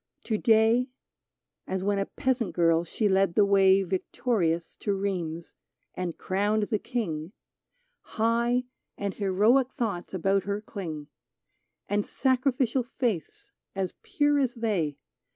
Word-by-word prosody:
To 220 - -1
day,— 230 +2 +4 0.8
As 190 0 -2
when 200 0 +1
a 195 - -1
peasant 250 -6 -1
girl 165 -1 +3
she 210 +5 -1
led 190 -2 +2
the 205 - +5
way 195 -1 +5
Victorious 185 -2 -1
to 200 -2 -1
Rheims 175 -4 -3 0.4
and 180 -2 -4
crowned 205 +3 0
the 210 0 -1
King, 190 -9 -3 0.3
— - - -47 0.2
High 235 +2 +2 0.3
and 200 -1 -2
heroic 215 +7 +3
thoughts 200 -7 -3
about 195 +1 +1
her 200 +1 -1
cling, 160 -8 -7 0.8
And 205 +1 +1
sacrificial 260 0 +1
faiths 255 - -3 0.2
as 190 -2 -2
pure 290 -1 +1
as 260 -2 0
they. 190 - -1
205 Hz, 130 wpm, -27 LUFS, 185-240 Hz, 0.8 s, the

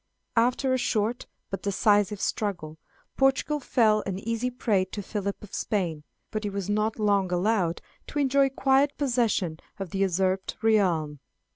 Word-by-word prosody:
After 250 +3 +2
a 260 - +1
short 225 0 -1 0.2
but 195 - -3
decisive 205 0 +2
struggle, 175 -8 -3 0.4
Portugal 270 +2 +2
fell 220 -5 +3
an 190 -2 -2
easy 230 +4 -2
prey 225 -6 +1
to 205 +2 -6
Philip 200 0 -4
of 205 - -12
Spain, 170 -8 -2 0.3
but 215 0 -3
he 205 - -1
was 200 -2 -4
not 215 +1 0
long 200 -4 +2
allowed 180 -2 +1 0.2
to - - -6
enjoy 275 -1 +3
quiet 270 +1 +2
possession 230 - 0 0.2
of 195 -4 -6
the 195 - -3
usurped 190 0 0
realm. 175 -9 +2
210 Hz, 150 wpm, -27 LUFS, 190-240 Hz, 0.4 s, fell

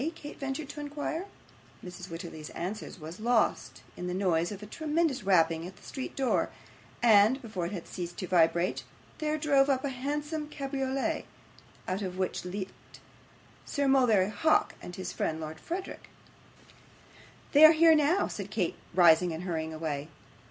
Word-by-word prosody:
Kate 295 -2 -10
ventured 275 +2 -3
to - - -7
inquire. 295 +5 -4 0.6
Mrs. 180 0 -8
Wititterly's 165 -2 -7
answer 195 +5 -4
was 160 +4 -8
lost 230 0 +1
in 180 - -5
the 180 - -2
noise 175 -3 +1
of 205 0 -7
a - - -6
tremendous 310 +3 0
rapping 165 -4 +2
at 190 - -11
the - - -20
street 265 - -6
door, 265 -2 +1 0.5
and 220 +3 +6
before 210 -9 -4
it - - -7
had 180 -5 -5
ceased 175 -1 -6
to 185 - -3
vibrate, 175 +1 +2 0.4
there 310 0 0
drove 285 -2 +3
up 265 0 +1
a - - 0
handsome 295 +4 -3
cabriolet, 270 -2 -2 0.6
out 185 +2 -2
of 185 -2 -4
which 185 -1 -2
leaped 190 +1 -7 0.6
Sir 285 -1 -1
Mulberry 230 -8 +4
Hawk 315 +7 +2
and 180 - -8
his 185 -1 -5
friend 160 0 -2
Lord 155 0 -6
Verisopht. 365 - -6 1.4
'They 295 +2 +7
are 310 - +12
here 325 +1 +6
now,' 310 +5 +3
said 200 -1 -6
Kate, 195 -5 -1 0.2
rising 175 -1 +6
and 160 +2 -5
hurrying 160 -3 -3
away. 155 -2 -3
210 Hz, 160 wpm, -29 LUFS, 175-285 Hz, 1.4 s, are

